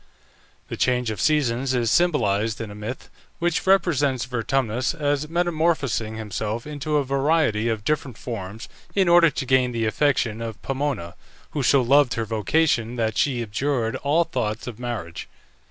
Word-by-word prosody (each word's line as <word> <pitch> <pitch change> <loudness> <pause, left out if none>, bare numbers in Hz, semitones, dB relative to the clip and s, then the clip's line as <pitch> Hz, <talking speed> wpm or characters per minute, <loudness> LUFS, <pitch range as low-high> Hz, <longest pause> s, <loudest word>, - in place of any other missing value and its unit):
The - - -6
change 125 -2 +1
of 105 - -5
seasons 130 -4 +1
is 120 -2 +1
symbolized 115 - +2
in 110 -2 -5
a - - -8
myth 105 +5 -7 0.3
which 175 +1 -1
represents 145 -9 +2
Vertumnus 125 0 -1
as 145 -1 -1
metamorphosing 160 -10 0
himself 110 +1 -4
into 150 0 -2
a 145 - +2
variety 135 -5 +1
of 110 -2 -2
different 140 -3 -2
forms 110 -2 -6 0.3
in 195 -2 +3
order 170 -1 +6
to 130 - -4
gain 130 -1 +2
the 115 -1 -1
affection 115 -1 +1
of 115 -2 -5
Pomona, 135 -11 -2 0.4
who 145 - -2
so 135 0 +4
loved 135 +1 +4
her 115 - -2
vocation 115 +2 +1
that 110 -2 -1
she 125 -4 +1
abjured 115 +1 -1
all 150 +4 +2
thoughts 120 -9 -3
of 120 -2 -7
marriage. 110 -9 -5
125 Hz, 155 wpm, -23 LUFS, 110-145 Hz, 0.4 s, order